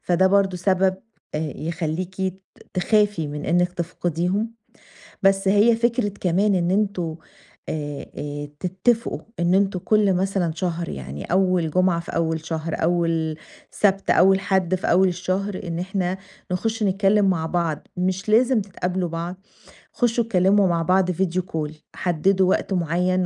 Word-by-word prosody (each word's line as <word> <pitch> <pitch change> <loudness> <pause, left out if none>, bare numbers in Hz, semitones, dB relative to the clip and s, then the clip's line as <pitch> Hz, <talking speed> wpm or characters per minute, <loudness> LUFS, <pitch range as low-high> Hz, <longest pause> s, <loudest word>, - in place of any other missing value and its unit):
فده 180 +1 +2
برضه 195 -1 +2
سبب 190 +1 +2 0.4
يخليكِ 160 +3 -3
ت 190 0 -3 0.4
تخافي 205 -2 +2
من 145 0 -5
إنِك 175 +1 +2
تفقديهم. 180 +5 -2 0.7
بس 195 0 +3
هي 210 +4 +5
فكرة 235 -1 +1
كمان 195 +3 +2
إن 175 0 +1
أنتم 190 -5 0 0.5
آآ 145 -2 -4
آآ 145 0 -5
تتفقوا 190 +6 0 0.2
إن 175 +1 +2
أنتم 195 -1 +2
كل 210 0 +3
مثلًا 185 -2 0
شهر 170 -1 -2
يعني 70 +2 -6
أول 185 -3 +2
جمعة 185 -1 +2
في 170 - -7
أول 160 -1 -1
شهر، 160 0 -3
أول 165 -2 +1 0.3
سبت، 195 -1 +1
أول 190 +1 +5
حد 190 -2 +1
في 185 - -4
أول 185 +2 +5
الشهر، 185 +2 -2
إن 170 -2 -4
إحنا 185 0 -2 0.3
نخشّ 220 +4 -1
نتكلم 200 +1 +3
مع 165 -3 0
بعض، 165 -3 -2
مش 185 +3 -1
لازم 240 +1 +4
تتقابلوا 180 -2 -3
بعض 170 +2 -4 0.6
خشّوا 235 -1 +1
اتكلموا 195 -2 +3
مع 170 -1 +1
بعض 185 +1 +2
Video 185 +1 0
call 155 -2 -2 0.2
حددوا 185 +2 +2
وقت 195 - 0
معين 180 +2 +1
185 Hz, 140 wpm, -23 LUFS, 170-195 Hz, 0.7 s, هي